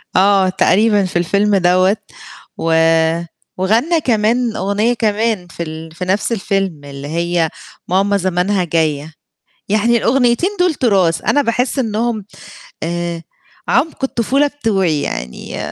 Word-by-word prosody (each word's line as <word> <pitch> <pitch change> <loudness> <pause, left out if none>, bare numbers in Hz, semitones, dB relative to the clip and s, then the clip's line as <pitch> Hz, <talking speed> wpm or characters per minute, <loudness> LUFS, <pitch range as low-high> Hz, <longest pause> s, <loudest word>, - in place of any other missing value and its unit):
آه 195 0 +4
تقريبًا 205 +2 +3
في 185 - -7
الفيلم 200 +4 +1
دوّة 185 +2 +3 0.6
و 165 0 0 0.8
وغنّى 230 - +1
كمان 230 -1 +1
أغنية 200 +5 0
كمان 220 -4 -1
في 170 0 -6
ال 160 0 -8
في 175 +3 -6
نفْس 195 +5 0
الفيلم، 195 -7 -2
اللي 140 0 -8
هي، 170 +1 0 0.4
ماما 200 +2 +2
زمانها 185 +1 0
جاية، 160 -2 -1 0.6
يعني 220 +3 +3
الأغنيّتين 245 +7 +2
دُول 360 -2 +3
تراس، 190 - +1
أنا 290 - +2
باحس 250 +2 -1
إنهم 225 -2 -1 0.6
آآ 170 0 -3 0.5
عمق 275 +2 +1
الطفولة 265 +3 +1
بتوعي 195 - 0
يعني 60 0 -5
200 Hz, 120 wpm, -17 LUFS, 175-230 Hz, 0.8 s, آه